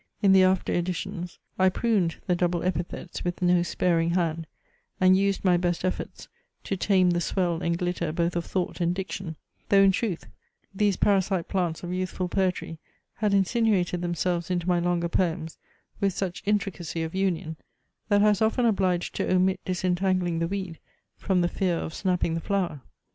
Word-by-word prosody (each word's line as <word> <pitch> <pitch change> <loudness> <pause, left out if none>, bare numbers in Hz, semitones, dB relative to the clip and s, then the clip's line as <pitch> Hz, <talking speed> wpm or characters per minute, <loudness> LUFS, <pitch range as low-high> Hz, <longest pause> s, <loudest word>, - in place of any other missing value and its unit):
In 195 - +6
the 190 - +7
after 185 0 +2
editions, 175 +1 -3 0.2
I 185 0 +5
pruned 195 -5 +1
the 180 - +1
double 175 -1 0
epithets 175 0 -3
with 175 0 -3
no 175 0 +4
sparing 170 -1 +1
hand, 165 -2 -1 0.5
and 185 0 +6
used 195 +1 0
my 180 -1 +5
best 175 0 -1
efforts 185 - -4 0.4
to 195 - -2
tame 185 -1 +3
the 175 0 0
swell 175 -2 0
and 170 -1 0
glitter 175 -2 -2
both 170 +2 -1
of 170 - 0
thought 180 -1 -3
and 175 +1 +1
diction; 190 -3 -5 0.3
though 195 -1 +6
in 195 - +6
truth, 190 -3 -2 0.5
these 200 -1 +1
parasite 195 -3 +1
plants 175 -4 -1
of 175 0 -4
youthful 185 0 -2
poetry 180 -4 -1 0.4
had 210 -1 +1
insinuated 195 -3 +2
themselves 175 0 -1
into 175 -1 -1
my 175 -1 +3
longer 170 0 0
poems 165 -2 -1 0.4
with 200 -2 +1
such 185 -1 -3
intricacy 195 -6 -1
of 160 - -5
union, 180 -4 -1 0.5
that 205 -1 +4
I 210 - +6
was 205 0 +1
often 225 +3 +2
obliged 185 -5 +1
to - - -1
omit 185 +1 +2
disentangling 185 -1 0
the 165 - 0
weed, 190 -3 -5 0.4
from 190 -2 0
the 175 - +2
fear 175 -1 0
of 160 - -5
snapping 180 -3 0
the 165 - -2
flower. 180 -8 -1
180 Hz, 175 wpm, -26 LUFS, 170-190 Hz, 0.5 s, the